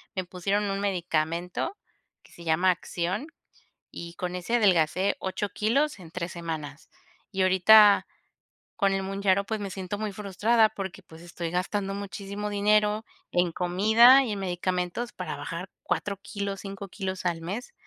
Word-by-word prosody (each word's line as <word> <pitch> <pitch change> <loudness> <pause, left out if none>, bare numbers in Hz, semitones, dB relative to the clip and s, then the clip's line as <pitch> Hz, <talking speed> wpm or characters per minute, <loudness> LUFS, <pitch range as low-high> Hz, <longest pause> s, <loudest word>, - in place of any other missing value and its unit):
me 185 - -1
pusieron 195 +3 -1
un 195 - -2
medicamento 175 - -1 0.5
que - - -21
se 170 - -13
llama 170 +3 +3
Acxion, 180 - -3 0.6
y 170 0 -8
con 180 +1 -4
ese 180 +6 -1
adelgacé 185 -2 +3
8 195 +2 -3
kilos 255 +6 0
en 165 -3 -12
3 175 0 -4
semanas. 160 -3 -6 0.4
Y 195 - -1
ahorita 200 +3 +7 0.7
con 195 -2 +2
el 195 0 -1
Mounjaro, 195 0 +1
pues, 220 +1 -3
me 200 -1 -4
siento 190 +1 -5
muy 215 0 -3
frustrada 215 +3 +2
porque, 195 -1 -7
pues, 160 -2 -14
estoy 170 -1 -6
gastando 195 +2 -1
muchísimo 200 +1 -5
dinero 210 +1 +2 0.3
en 175 -1 +2
comida 220 +10 +6
y 235 - -3
en 200 - -4
medicamentos 180 +4 -2
para - - -5
bajar - - -6
4 200 -1 -2
kilos, 200 -1 -4
5 195 0 -7
kilos 190 -1 -5
al 170 -2 -1
mes. 210 - -5
195 Hz, 155 wpm, -27 LUFS, 180-205 Hz, 0.7 s, ahorita